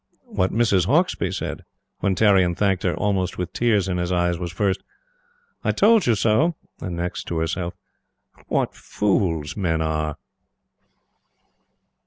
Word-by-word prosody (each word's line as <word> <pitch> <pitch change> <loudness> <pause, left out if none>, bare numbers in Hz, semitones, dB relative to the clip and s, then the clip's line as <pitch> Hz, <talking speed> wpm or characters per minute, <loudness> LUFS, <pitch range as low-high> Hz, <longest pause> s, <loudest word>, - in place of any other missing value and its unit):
What 95 +1 +1
Mrs. 100 -6 +2
Hauksbee 170 - +2
said, - - -4 0.4
when 95 -1 +1
Tarrion 95 -4 +4
thanked 95 -2 +1
her, 90 -4 0
almost 95 -4 -1
with 90 -1 -4
tears 105 -5 +2
in 90 -1 -1
his 90 0 -1
eyes, 90 -1 +1
was 85 -2 -4
first: 95 +2 0 0.8
"I - - +2
told 215 - +4
you 115 - +4
so!" 115 - +2 0.2
and 90 -2 -4
next, 85 +1 -3
to 85 - -3
herself: 85 +2 -2 0.7
"What - - 0
fools 85 -7 -1
men 85 -5 0
are!" 75 -1 -1
95 Hz, 140 wpm, -23 LUFS, 85-105 Hz, 0.8 s, Tarrion